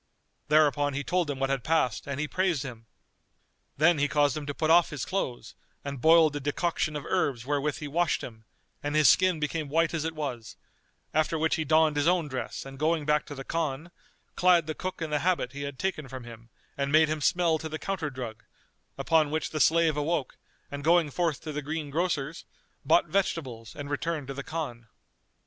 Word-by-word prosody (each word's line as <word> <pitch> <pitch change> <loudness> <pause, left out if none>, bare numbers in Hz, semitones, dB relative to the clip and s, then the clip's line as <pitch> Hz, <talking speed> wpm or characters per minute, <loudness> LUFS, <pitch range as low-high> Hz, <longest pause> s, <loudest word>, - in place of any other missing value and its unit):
Thereupon 145 -2 +3
he 140 - -2
told 175 0 0
him 140 - -2
what 135 0 0
had 135 -3 -1
passed 155 -7 0
and 140 -1 -3
he 150 - -1
praised 180 -5 0
him. 115 -4 -9 0.9
Then 160 +2 +4
he 145 - +3
caused 145 -1 +2
him 150 -1 -5
to 145 - -2
put 160 -1 +1
off 170 0 +6
his 145 -4 -4
clothes 135 -11 -3 0.3
and 140 -3 -5
boiled 160 -2 +6
a - - -1
decoction 150 +2 -1
of 150 - -5
herbs 140 -10 0
wherewith 145 +1 0
he 150 - -6
washed 165 +1 0
him, 110 -2 -10 0.4
and 145 +1 -3
his 155 -2 +5
skin 185 -3 +4
became 150 0 -2
white 165 +2 +2
as 160 -2 -1
it 160 0 -3
was; 130 -7 -5 0.6
after 155 +1 +1
which 160 +1 +1
he 160 - 0
donned 155 0 +3
his 145 +2 +2
own 175 -3 +2
dress 130 -1 -5
and 135 0 -10
going 155 0 +1
back 150 0 +1
to 145 - -7
the 135 - -7
Khan, 160 +1 -3 0.4
clad 180 -2 +4
the 155 - -3
cook 185 0 -5
in 155 - -4
the 150 - +1
habit 170 -6 0
he 140 +1 -7
had 140 -1 -5
taken 185 -5 -2
from 130 -1 -8
him 115 0 -12 0.3
and 140 0 -2
made 155 +1 +6
him 155 0 -2
smell 170 0 +2
to 160 - -5
the 155 - -4
counter 170 -4 -3
drug; 120 -5 -7 0.5
upon 160 -2 +2
which 155 +1 -2
the 155 - -3
slave 165 0 +4
awoke 150 -2 -1 0.4
and 145 0 -6
going 165 -1 +3
forth 165 -2 -1
to 155 - -6
the 150 0 -3
greengrocer's, 155 +1 -2 0.4
bought - - +4
vegetables 130 - -2
and 145 -1 -7
returned 150 -1 -2
to - - -3
the 140 - -5
Khan. 135 -7 -5
150 Hz, 205 wpm, -28 LUFS, 140-165 Hz, 0.9 s, off